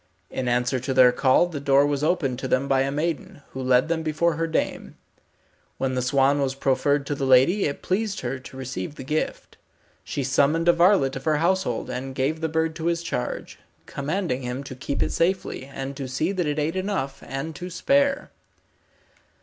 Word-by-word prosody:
In 130 Hz, -, -3 dB
answer 125 Hz, +2 st, +1 dB
to 130 Hz, +1 st, -3 dB
their 125 Hz, -1 st, +7 dB
call 130 Hz, +6 st, +4 dB
the 170 Hz, -5 st, -5 dB
door 140 Hz, 0 st, +4 dB
was 145 Hz, 0 st, -1 dB
opened 150 Hz, -7 st, 0 dB
to 135 Hz, -, -3 dB
them 130 Hz, +2 st, +1 dB
by 135 Hz, -1 st, +3 dB
a 135 Hz, -, 0 dB
maiden, 160 Hz, +2 st, -3 dB
who 130 Hz, -, -6 dB
led 125 Hz, +1 st, +3 dB
them 165 Hz, 0 st, 0 dB
before 160 Hz, +2 st, +1 dB
her 165 Hz, +2 st, -1 dB
dame. 160 Hz, -, -2 dB, 0.8 s
When 135 Hz, -1 st, -1 dB
the 130 Hz, -, 0 dB
swan 135 Hz, +2 st, +2 dB
was 135 Hz, -1 st, -1 dB
proffered 140 Hz, +1 st, +1 dB
to 145 Hz, -, -2 dB
the 135 Hz, -1 st, -2 dB
lady 135 Hz, +10 st, +5 dB
it 140 Hz, -, -3 dB
pleased 200 Hz, +2 st, -1 dB
her 130 Hz, +1 st, -3 dB
to 130 Hz, 0 st, -12 dB
receive 130 Hz, -1 st, -5 dB
the -, -, -8 dB
gift. 150 Hz, +4 st, -3 dB, 0.5 s
She 140 Hz, -, -3 dB
summoned 140 Hz, +5 st, +2 dB
a 175 Hz, -, +7 dB
varlet 170 Hz, -6 st, +4 dB
of 135 Hz, -, -9 dB
her 155 Hz, -1 st, +2 dB
household 170 Hz, -7 st, 0 dB
and 130 Hz, +1 st, -5 dB
gave 145 Hz, +5 st, -1 dB
the 160 Hz, -, 0 dB
bird 160 Hz, 0 st, 0 dB
to 165 Hz, -1 st, -3 dB
his 170 Hz, 0 st, 0 dB
charge, 125 Hz, -7 st, -4 dB, 0.3 s
commanding 145 Hz, -, -2 dB
him 125 Hz, +2 st, -4 dB
to 135 Hz, -2 st, -8 dB
keep 140 Hz, +2 st, -2 dB
it -, -, -2 dB
safely, 175 Hz, -6 st, -1 dB
and 135 Hz, 0 st, -6 dB
to 135 Hz, -2 st, -4 dB
see 130 Hz, +8 st, -1 dB
that 180 Hz, -5 st, -1 dB
it 145 Hz, 0 st, -1 dB
ate 155 Hz, +3 st, -1 dB
enough 185 Hz, -9 st, -2 dB
and 145 Hz, +4 st, -5 dB
to 180 Hz, +1 st, -6 dB
spare. 275 Hz, -, +1 dB
140 Hz, 200 wpm, -24 LUFS, 130-165 Hz, 0.8 s, their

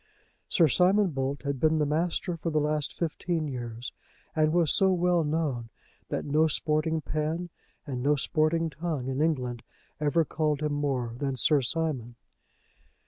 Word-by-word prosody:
Sir 170 Hz, -5 st, +5 dB
Simon 185 Hz, -, +4 dB
Bolt 135 Hz, 0 st, -2 dB
had 140 Hz, -2 st, -2 dB
been 160 Hz, +2 st, +3 dB
the 150 Hz, -, +2 dB
master 170 Hz, +4 st, -1 dB
for 165 Hz, +1 st, -3 dB
the 155 Hz, -1 st, +1 dB
last 150 Hz, -1 st, -1 dB
fifteen 165 Hz, -1 st, -2 dB
years, 120 Hz, -2 st, -6 dB, 0.4 s
and 155 Hz, -1 st, +3 dB
was 170 Hz, -2 st, +3 dB
so 190 Hz, -1 st, +4 dB
well 180 Hz, -1 st, +2 dB
known 150 Hz, -7 st, -1 dB, 0.4 s
that -, -, -2 dB
no 155 Hz, +2 st, +3 dB
sporting 155 Hz, +1 st, +1 dB
pen 155 Hz, +4 st, -2 dB, 0.3 s
and 130 Hz, -5 st, -4 dB
no 145 Hz, +3 st, +3 dB
sporting 155 Hz, +3 st, +1 dB
tongue 150 Hz, -4 st, -3 dB
in 135 Hz, +2 st, -1 dB
England 125 Hz, -7 st, 0 dB, 0.4 s
ever 155 Hz, +2 st, +2 dB
called 150 Hz, 0 st, -1 dB
him 150 Hz, -1 st, 0 dB
more 135 Hz, -5 st, -1 dB
than 135 Hz, -2 st, -1 dB
Sir 145 Hz, +3 st, +3 dB
Simon. 130 Hz, -4 st, -2 dB
155 Hz, 155 wpm, -28 LUFS, 140-165 Hz, 0.4 s, Sir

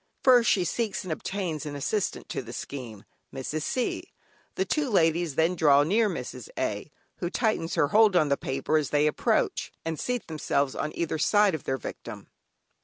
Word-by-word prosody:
First 245 Hz, -3 st, +6 dB
she 195 Hz, -5 st, +3 dB
seeks 215 Hz, +4 st, -2 dB
and 180 Hz, -4 st, -2 dB
obtains 170 Hz, -3 st, -4 dB
an 150 Hz, -2 st, -5 dB
assistant 190 Hz, +8 st, -2 dB
to -, -, -3 dB
the 120 Hz, -1 st, -9 dB
scheme, 120 Hz, -8 st, -7 dB, 0.3 s
Mrs. 140 Hz, +4 st, -4 dB
C. 250 Hz, +10 st, -2 dB, 0.4 s
The 380 Hz, -, 0 dB
two 300 Hz, -6 st, 0 dB
ladies 165 Hz, -, +2 dB
then 165 Hz, +4 st, +2 dB
draw 145 Hz, -4 st, +5 dB
near 210 Hz, +7 st, +2 dB
Mrs. -, -, -6 dB
A. -, -, -2 dB, 0.3 s
(who 175 Hz, -, -3 dB
tightens 215 Hz, -6 st, 0 dB
her 145 Hz, -, +2 dB
hold 215 Hz, -1 st, +5 dB
on 155 Hz, -4 st, +4 dB
the 140 Hz, -, +3 dB
paper 135 Hz, +3 st, -1 dB
as 150 Hz, -, -3 dB
they 150 Hz, 0 st, +2 dB
approach) 150 Hz, -, 0 dB
and 165 Hz, -1 st, -3 dB
seat 250 Hz, -1 st, -2 dB
themselves 145 Hz, -3 st, -1 dB
on 155 Hz, -, -3 dB
either 160 Hz, -2 st, -2 dB
side 205 Hz, +2 st, +4 dB
of 155 Hz, -, -5 dB
their 135 Hz, -, -1 dB
victim. -, -, -8 dB
165 Hz, 180 wpm, -27 LUFS, 145-210 Hz, 0.4 s, First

